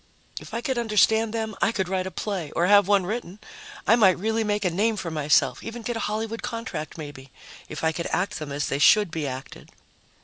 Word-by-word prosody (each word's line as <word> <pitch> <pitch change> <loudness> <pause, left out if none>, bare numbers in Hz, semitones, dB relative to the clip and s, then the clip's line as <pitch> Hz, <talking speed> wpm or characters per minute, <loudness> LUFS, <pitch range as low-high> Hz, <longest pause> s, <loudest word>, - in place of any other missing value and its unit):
If - - -9
I 235 - -2
could 260 -1 -1
understand 220 0 +3
them, 220 -1 -3
I - - +3
could 190 -5 -2
write 185 0 -1
a - - -3
play 190 -3 -4
or 170 - +2
have 205 +1 +6
one 200 -2 +3
written; 210 -2 -4 0.5
I 230 - +6
might 195 -6 +5
really 220 +3 0
make 210 -1 -1
a 180 - +2
name 215 +6 +1
for 170 -4 -4
myself, 145 -4 +2
even 230 +1 -7
get 240 +1 -3
a - - -2
Hollywood 220 +1 -3
contract, 230 - -5
maybe, 145 -3 -9 0.4
if 155 - -7
I 160 - +3
could 170 +1 -4
act 200 +3 -1
them 150 -2 -6
as 145 +1 -2
they 140 - -2
should 205 +4 +5
be 160 -3 -3
acted. 130 +1 -8
200 Hz, 225 wpm, -25 LUFS, 160-220 Hz, 0.5 s, have